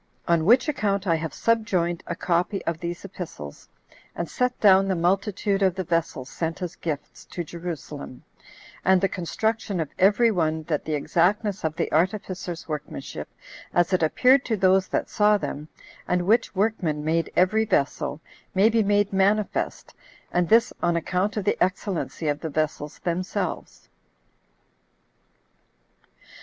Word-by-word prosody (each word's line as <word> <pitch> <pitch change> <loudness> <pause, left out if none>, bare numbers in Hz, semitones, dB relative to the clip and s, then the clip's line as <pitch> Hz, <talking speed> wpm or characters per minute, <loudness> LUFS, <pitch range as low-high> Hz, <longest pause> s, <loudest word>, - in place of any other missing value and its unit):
On 170 -2 +2
which 245 - +5
account 205 -9 0
I 170 - +3
have 160 0 -2
subjoined 185 -7 0
a - - -3
copy 180 +3 -1
of 165 -1 -2
these 175 +2 -5
epistles, 165 - -8 0.5
and 170 - -3
set 250 +6 -1
down 195 -2 +6
the 190 - +1
multitude 195 +3 0
of 190 -2 +3
the 190 - -2
vessels 165 -6 -1
sent 165 +5 -4
as 180 -1 -5
gifts 150 -4 -5
[to 175 - -5
Jerusalem], 160 -6 -7 0.6
and 190 0 +5
the 195 - +2
construction 200 +2 -2
of 155 -3 -3
every 210 +5 +5
one, 160 -4 0
that 155 -2 -2
the 155 - -1
exactness 195 +7 +1
of 160 -1 -1
the 165 - -2
artificers' 180 0 -1
workmanship, 150 -3 -6 0.5
as 175 +1 +3
it 185 - +3
appeared 255 - +4
to 220 - 0
those 190 0 +3
that - - -1
saw 210 0 +3
them, 150 -6 -5 0.4
and 180 0 +1
which 225 +2 +2
workman 180 -8 0
made 165 +1 0
every 215 +5 +3
vessel, 145 -5 0 0.4
may 200 +4 +5
be 230 0 +3
made 205 -1 +2
manifest, 200 +2 0 0.4
and 175 -1 +1
this 230 +1 +4
on 170 - +2
account 180 +5 -1
of 210 - -1
the - - +2
excellency 185 -3 -2
of 145 0 0
the 160 - -4
vessels 150 0 -2
themselves. 180 +1 -3
180 Hz, 150 wpm, -25 LUFS, 165-205 Hz, 0.6 s, down